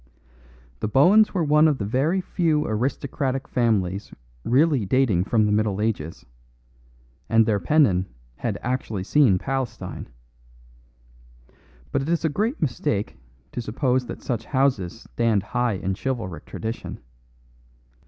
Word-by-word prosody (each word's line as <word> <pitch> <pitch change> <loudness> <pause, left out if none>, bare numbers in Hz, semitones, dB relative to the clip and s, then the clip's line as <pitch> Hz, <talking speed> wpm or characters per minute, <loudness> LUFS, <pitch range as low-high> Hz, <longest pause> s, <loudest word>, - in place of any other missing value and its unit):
The - - -2
Bohuns 185 - +5
were 175 - +2
one 150 +1 +5
of 150 -3 +1
the 100 - -3
very 145 - +1
few 165 -4 0
aristocratic 130 +3 -2
families 100 -6 0 0.3
really 140 0 +3
dating 105 -4 +2
from 110 0 +2
the 105 - +1
Middle 105 -1 +1
Ages, 105 -8 -3 1.0
and 115 0 +5
their 105 -2 +1
pennon 100 - +3 0.3
had 110 -4 -2
actually 120 -6 -2
seen 125 -4 +4
Palestine. 135 +3 -4 1.8
But - - 0
it 140 - -4
is 170 -1 +1
a - - +3
great 215 - -1
mistake 110 -6 -1 0.4
to - - -4
suppose 125 +2 0
that - - -8
such 115 -3 -3
houses 125 -8 0
stand 115 -4 0
high 120 +1 0
in 95 0 -2
chivalric 110 -6 -4
tradition. 110 +1 -5
120 Hz, 130 wpm, -24 LUFS, 105-140 Hz, 1.8 s, Bohuns